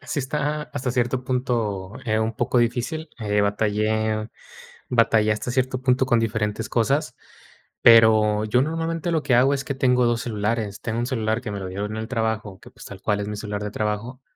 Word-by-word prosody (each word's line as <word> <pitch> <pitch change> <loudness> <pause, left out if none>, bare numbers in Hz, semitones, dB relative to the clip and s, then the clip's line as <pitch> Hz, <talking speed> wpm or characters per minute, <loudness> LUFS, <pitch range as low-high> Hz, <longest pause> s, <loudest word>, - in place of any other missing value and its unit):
sí 145 - -2
está 150 +2 -2
hasta 125 -3 -4
cierto 125 +1 0
punto, 115 -7 -2
eh, 110 0 +1
un 110 +1 0
poco 120 0 +1
difícil, 125 +7 -1
eh, 105 -2 0
batallé 110 +1 0 0.6
batallé 115 -3 +3
hasta 105 +3 -2
cierto 130 0 -1
punto 130 0 +2
con 120 -3 +3
diferentes 110 0 -2
cosas, 130 +4 0 0.7
pero, 110 -2 +6
yo 125 +4 +2
normalmente, 165 +2 -2
lo 160 - +1
que 130 -4 +3
hago 130 +3 +4
es 140 -1 -2
que 140 +1 -4
tengo 125 -2 +3
2 120 -1 +1
celulares. 105 -2 -2
Tengo 115 -1 -3
1 120 - 0
celular 110 -4 -1
que 110 - -5
me 100 - -4
lo 95 - -5
dieron 100 +3 -4
en - - -5
el 110 0 -4
trabajo, 110 -5 -2
que - - -15
pues, - - -14
tal 100 - -9
cual 105 -1 0
es 100 - -4
mi 105 - -4
celular 105 -1 -4
de 105 - -3
trabajo, 110 +5 -3
115 Hz, 200 wpm, -23 LUFS, 105-130 Hz, 0.7 s, pero